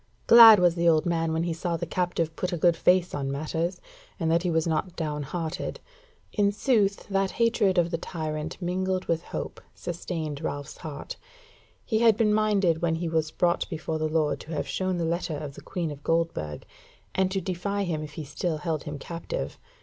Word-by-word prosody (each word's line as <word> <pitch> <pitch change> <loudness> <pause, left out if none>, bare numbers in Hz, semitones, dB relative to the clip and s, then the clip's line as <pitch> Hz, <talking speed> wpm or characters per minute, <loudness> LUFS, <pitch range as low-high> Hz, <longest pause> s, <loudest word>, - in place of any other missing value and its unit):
Glad 230 -2 +10
was 175 -1 +4
the 170 0 +3
old 155 -2 +3
man 165 -2 0
when 160 +1 0
he 170 -1 -1
saw 170 +1 -2
the - - -3
captive 170 -3 -1
put 180 +2 -2
a 175 - -1
good 170 +1 +4
face 180 +1 +3
on 135 -1 -2
matters, 160 +5 -2 0.4
and 165 -2 +1
that 170 +1 +3
he 180 - -1
was 160 -1 +1
not 165 +2 -1
down 150 -2 -2
hearted. 160 +3 -4 0.5
In 205 -2 +3
sooth 205 -2 +1
that 195 -1 +1
hatred 225 -5 +2
of 170 -1 +3
the 165 - -1
tyrant 155 -2 -4
mingled 185 +1 -1
with 165 -1 0
hope - - -6
sustained 160 -4 -4
Ralph's 145 -2 -5
heart. 150 -3 -7 0.7
He 220 -3 +1
had 225 -2 +5
been 210 -2 +3
minded 205 -6 +2
when 165 -1 +1
he 170 +1 -2
was 160 -1 0
brought 170 +2 0
before 160 -1 -3
the 155 0 0
lord 155 -1 +1
to 160 - -8
have 150 - -2
shown 185 -1 -1
the 170 - -1
letter 165 -2 -1
of 145 -1 -6
the - - -11
Queen 170 -5 -3
of 145 -1 -9
Goldburg, 165 - -1 0.5
and 190 -1 +2
to 195 0 -1
defy 190 +3 -2
him 165 -5 -2
if 150 -1 -8
he 155 - -5
still 155 +3 -2
held 155 -2 -3
him 150 -1 -5
captive. 170 - -5
170 Hz, 205 wpm, -27 LUFS, 155-185 Hz, 0.7 s, Glad